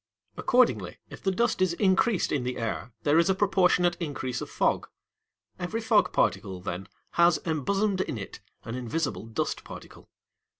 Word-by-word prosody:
Accordingly, 250 Hz, 0 st, +2 dB
if -, -, -10 dB
the 195 Hz, -, +1 dB
dust 220 Hz, +1 st, +1 dB
is 185 Hz, -2 st, +3 dB
increased 190 Hz, +3 st, +2 dB
in 140 Hz, -4 st, 0 dB
the 125 Hz, 0 st, -3 dB
air, 115 Hz, +1 st, -3 dB
there 150 Hz, +2 st, +4 dB
is 170 Hz, -, +3 dB
a 190 Hz, -, +3 dB
proportionate 180 Hz, -3 st, +3 dB
increase 135 Hz, -6 st, -3 dB
of -, -, -6 dB
fog. -, -, 0 dB, 0.7 s
Every -, -, -2 dB
fog -, -, +3 dB
particle, 95 Hz, -3 st, 0 dB
then, 90 Hz, +2 st, -5 dB, 0.2 s
has 170 Hz, -1 st, +4 dB
embosomed 190 Hz, +6 st, 0 dB
in 150 Hz, -, -3 dB
it 100 Hz, -, -7 dB, 0.2 s
an 115 Hz, -, -6 dB
invisible 125 Hz, 0 st, -3 dB
dust 110 Hz, -, -2 dB
particle. -, -, -12 dB
165 Hz, 160 wpm, -27 LUFS, 125-190 Hz, 0.7 s, there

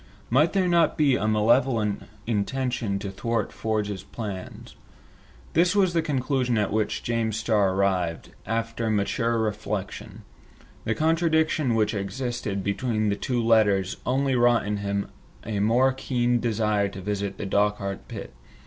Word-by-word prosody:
Might 150 Hz, +7 st, +4 dB
there 190 Hz, -2 st, +2 dB
not 170 Hz, -3 st, +3 dB
be 145 Hz, -3 st, +4 dB
rather 115 Hz, -, 0 dB
a -, -, +1 dB
malevolent 110 Hz, 0 st, +2 dB, 0.2 s
intention 120 Hz, -1 st, -1 dB
to 100 Hz, 0 st, -5 dB
thwart 115 Hz, +4 st, -2 dB
Ford's 105 Hz, -3 st, -2 dB
plans? 100 Hz, -2 st, -7 dB, 0.8 s
This 175 Hz, +4 st, +3 dB
was 190 Hz, -3 st, +3 dB
the 165 Hz, -, +2 dB
conclusion 130 Hz, -4 st, 0 dB
at 105 Hz, -1 st, 0 dB
which 110 Hz, -1 st, -1 dB
James 115 Hz, -2 st, -1 dB
Starr 105 Hz, -4 st, +2 dB
arrived, 90 Hz, -4 st, 0 dB, 0.2 s
after 115 Hz, +1 st, -2 dB
mature 115 Hz, +3 st, 0 dB
reflection. 105 Hz, -1 st, -4 dB, 0.6 s
The 110 Hz, -, 0 dB
contradiction 160 Hz, -4 st, +2 dB
which 105 Hz, -1 st, +1 dB
existed 105 Hz, -1 st, -3 dB
between 110 Hz, +1 st, 0 dB
the 100 Hz, -, +1 dB
two 120 Hz, +2 st, -1 dB
letters 105 Hz, -4 st, +3 dB
only 135 Hz, +1 st, +1 dB
wrought 120 Hz, -3 st, +3 dB
in 105 Hz, 0 st, -1 dB
him 100 Hz, 0 st, -2 dB, 0.4 s
a 105 Hz, -2 st, -2 dB
more 120 Hz, +6 st, +3 dB
keen 125 Hz, -2 st, 0 dB
desire 105 Hz, -3 st, +1 dB
to 95 Hz, -, -9 dB
visit 100 Hz, 0 st, -3 dB
the 105 Hz, -, -4 dB
Dochart 100 Hz, -1 st, -1 dB
pit. -, -, -8 dB
110 Hz, 145 wpm, -25 LUFS, 100-125 Hz, 0.8 s, Might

